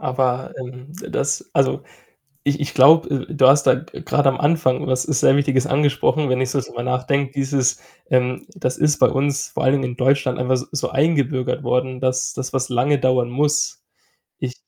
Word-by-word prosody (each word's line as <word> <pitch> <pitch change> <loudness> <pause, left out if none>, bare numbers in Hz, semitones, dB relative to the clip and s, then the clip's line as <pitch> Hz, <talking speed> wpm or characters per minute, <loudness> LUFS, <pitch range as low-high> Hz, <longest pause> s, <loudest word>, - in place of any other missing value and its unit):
Aber, 130 0 -1
ähm, 130 +3 -10 0.2
das - - -2
also, 65 0 +1 0.6
ich 145 +1 0
ich 145 - -4
glaube, 155 +4 +6 0.2
äh, 165 - -6
du 135 -3 +5
hast 140 +2 +6
da, - - +7 0.2
äh, - - -9
grad 145 -3 0
am 135 - +2
Anfang 145 -4 +1
was 130 -1 +1
sehr 140 -2 +3
Wichtiges 140 -2 +1
angesprochen, 145 +1 +1
wenn 130 0 0
ich 130 - -1
so 140 - 0
drüber 120 -1 -7
nachdenke, 130 +2 -1
dieses, 135 -2 0 0.3
ähm 125 0 0
das 125 0 -2
ist 150 -1 +2
bei - - +5
uns 140 +1 -1
vor - - -5
allen 130 - +3
Dingen 125 -2 -3
in - - -10
Deutschland 135 0 +1
einfach 125 +1 +1
s 125 - -5
so 150 - -2
eingebürgert 140 -2 0
worden, 125 +1 -1
dass 130 0 -1
dass 130 -1 -5
was 130 0 -1
lange 130 +3 +1
dauern 130 -2 +1
muss. 150 +3 0 0.6
Ich 125 -1 -4
130 Hz, 190 wpm, -20 LUFS, 125-145 Hz, 0.6 s, da